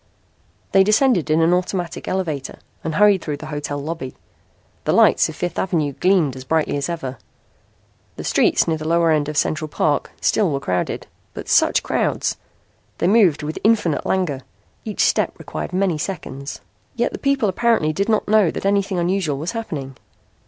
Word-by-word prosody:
They 195 - +6
descended 215 - +3
in 160 +1 +3
an 170 +2 +4
automatic 180 -3 -2
elevator 160 -8 -3 0.3
and 160 -1 -3
hurried 205 -1 +5
through 150 -3 -4
the 155 - -9
hotel 145 -1 -3
lobby. 145 -2 -5 0.7
The - - +2
lights - - +4
of - - -8
Fifth 175 - -3
Avenue 160 -6 0
gleamed 175 -5 +2
as 130 - -8
brightly 155 +3 0
as 140 +1 -2
ever. 135 -8 -5 1.0
The - - -7
streets - - +2
near 160 -1 0
the 155 - -5
lower 165 0 +3
end 150 -1 +1
of 150 - -4
Central 155 +1 0
Park 150 -1 0
still 205 -5 +2
were 140 -2 -1
crowded. 90 -9 -2 0.3
But - - -7
such - - +3
crowds! - - -1 0.6
They - - -1
moved 185 -7 +4
with 155 +1 -4
infinite 210 -8 +2
langour. 170 -8 -1 0.4
Each - - -2
step - - +1
required - - -6
many 185 -4 0
seconds. 140 -6 -6 0.3
Yet 240 0 0
the - - -5
people 275 -5 +1
apparently 195 -5 +1
did 200 +7 -1
not 215 -1 +1
know 210 -4 +4
that - - -5
anything 200 -1 +1
unusual 175 -4 0
was 155 +5 -3
happening. 150 - -5
165 Hz, 175 wpm, -21 LUFS, 150-195 Hz, 1.0 s, They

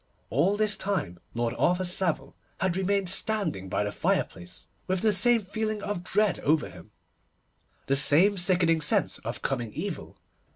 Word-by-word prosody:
All 175 - +2
this 215 -1 +1
time 185 - -3 0.2
Lord 120 0 -1
Arthur 180 +1 +2
Savile 180 -2 -1 0.2
had 185 -1 0
remained 195 0 0
standing 185 - +1
by 105 - 0
the 105 - -3
fireplace, 90 -2 -3 0.2
with 185 -1 -1
the 215 -1 +3
same 230 +3 +3
feeling 215 +1 -3
of 205 -4 -4
dread 210 +1 +1
over 155 +2 0
him, - - -14 1.0
the 135 - +1
same 160 +8 +5
sickening 175 -3 +2
sense 150 - +1
of - - -7
coming 120 -5 -2
evil. 175 +3 -6
180 Hz, 155 wpm, -27 LUFS, 150-205 Hz, 1.0 s, same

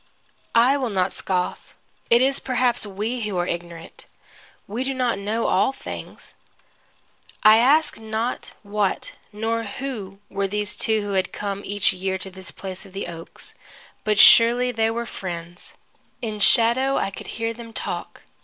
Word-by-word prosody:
I 250 +5 +5
will 260 -4 -1
not 190 -2 +1
scoff. 180 -1 -2 0.3
It 235 +2 +6
is 270 +1 +2
perhaps 245 -3 +1
we 215 +5 -3
who 210 -4 -2
are 175 - +1
ignorant. 170 -1 -6 0.6
We 225 +6 -3
do 270 0 -2
not 245 -5 0
know 215 +3 -1
all 195 - +3
things. 270 - -9 1.1
I 215 +1 +8
ask 280 +6 +3
not 220 +2 -3
what 205 -1 -1 0.2
nor 225 +2 -1
who 215 -3 -6
were 195 0 -1
these 210 +1 0
two 220 -2 +1
who 205 -1 -3
had 190 -1 +1
come 200 -1 -4
each 205 0 +2
year 190 +1 -2
to 190 0 -7
this 185 -1 -8
place 190 +1 -7
of 195 -2 -15
the 195 - -4
oaks, 165 -1 -7 0.5
but 210 -1 +1
surely 240 +3 +7
they 225 -1 +1
were 235 +1 -2
friends. 175 -4 -7 0.5
In 215 -3 -4
shadow, 245 +5 +4
I 195 - 0
could - - -9
hear 230 0 -1
them 230 0 -10
talk. - - -5
215 Hz, 160 wpm, -23 LUFS, 195-235 Hz, 1.1 s, I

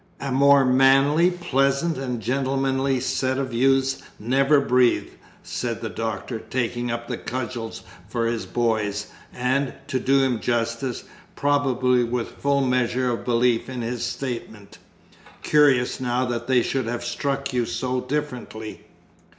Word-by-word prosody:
"A 140 -1 -4
more 140 +1 +5
manly, 135 +6 +5
pleasant, 160 -2 0
and 125 -3 -3
gentlemanly 135 +2 0
set 130 0 -1
of 135 -2 -3
youths 135 +2 +2 0.2
never 135 +6 +3
breathed!" 125 -3 +2 0.3
said 115 -2 -4
the 115 -3 -4
Doctor, 110 +3 -4
taking 120 0 -2
up 120 0 -4
the 120 - -4
cudgels 120 -2 -5 0.3
for 115 +1 -1
his 115 -1 -2
boys, 110 -4 -1 0.2
and, 130 +1 -1
to 130 - -1
do 135 +2 +3
him 125 -4 +1
justice, 120 +2 -2 0.3
probably 130 -3 +2
with 120 0 -2
full 140 0 +2
measure 125 -1 +1
of 115 - -3
belief 120 -1 +2
in 125 -2 -4
his 120 0 -3
statement. 115 -4 -5 0.6
"Curious 140 -5 +3
now 125 0 0
that 120 -1 -3
they 125 -2 +3
should 130 -4 -1
have 120 0 -3
struck 140 +3 -2
you 120 -2 0
so 125 0 -2
differently!" 125 -6 -5
125 Hz, 140 wpm, -23 LUFS, 120-135 Hz, 0.6 s, more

